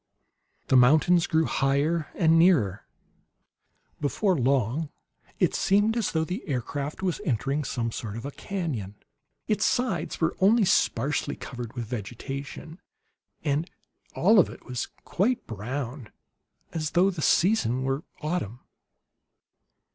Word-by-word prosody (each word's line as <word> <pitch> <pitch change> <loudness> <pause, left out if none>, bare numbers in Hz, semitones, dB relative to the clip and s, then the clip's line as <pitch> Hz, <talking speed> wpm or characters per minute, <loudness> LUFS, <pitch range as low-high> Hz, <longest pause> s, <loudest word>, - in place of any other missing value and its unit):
The - - +4
mountains 155 +7 +5
grew 160 0 +2
higher 145 +4 +1
and 165 -1 +4
nearer. 130 - +3 1.1
Before 185 +6 +1
long 135 +2 +1 0.5
it - - +2
seemed 205 +3 +2
as 235 - 0
though 160 -1 +1
the 180 +8 -4
aircraft 145 +4 -3
was 185 +1 -1
entering 140 - -1
some 115 -3 -2
sort 110 -2 -5
of 115 - -7
a 140 - -4
canon. 140 - -4 0.5
Its 210 - +1
sides 245 -8 0
were 165 0 +1
only 205 +3 +5
sparsely 145 -5 +1
covered 120 -3 -7
with 120 -2 -4
vegetation, 135 - -6 0.6
and 150 +3 0 0.5
all 210 +4 +5
of 180 - +4
it - - -12
was 125 -1 -3 0.2
quite 235 +7 0
brown, 120 +3 -5 0.6
as 155 -2 -2
though 185 +3 +4
the 170 -4 -6
season 145 - +2
were 135 +3 -1 0.2
autumn. 150 - -3
150 Hz, 125 wpm, -26 LUFS, 125-180 Hz, 1.1 s, mountains